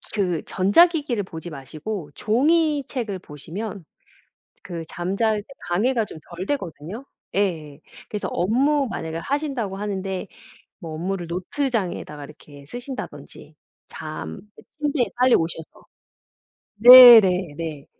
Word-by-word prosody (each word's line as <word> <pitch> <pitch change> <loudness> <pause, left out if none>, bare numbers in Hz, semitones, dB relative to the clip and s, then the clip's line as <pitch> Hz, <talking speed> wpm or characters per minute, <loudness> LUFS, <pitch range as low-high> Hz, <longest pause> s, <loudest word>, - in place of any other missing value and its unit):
그 180 -6 -1
전자기기를 245 - +3
보지 170 -1 -9
마시고 155 +4 -7
종이 295 - +2
책을 220 -8 -4
보시면 180 +5 -8 0.8
그 170 -2 -6
잠잘 205 +5 -1
때 - - -24 0.2
방해가 225 +7 +1
좀 185 - -10 0.2
덜 185 - -5
되거든요. 190 - -5 0.3
예. 160 -8 -2 0.3
그래서 210 - -4
업무 270 - +1
만약에 160 0 -5
하신다고 270 - -3
하는데 195 -1 -4 0.5
뭐 165 -5 -8
업무를 175 +2 -3
노트장에다 180 - -3
이렇게 145 -1 -14
쓰신다든지 245 - -9 0.3
잠 - - -7 0.2
그 - - -15 0.2
침대에 290 -4 0
빨리 250 0 +5
오셔서 165 -1 -3 0.9
네네네. 185 - +8
195 Hz, 255 characters per minute, -23 LUFS, 165-245 Hz, 0.9 s, 네네네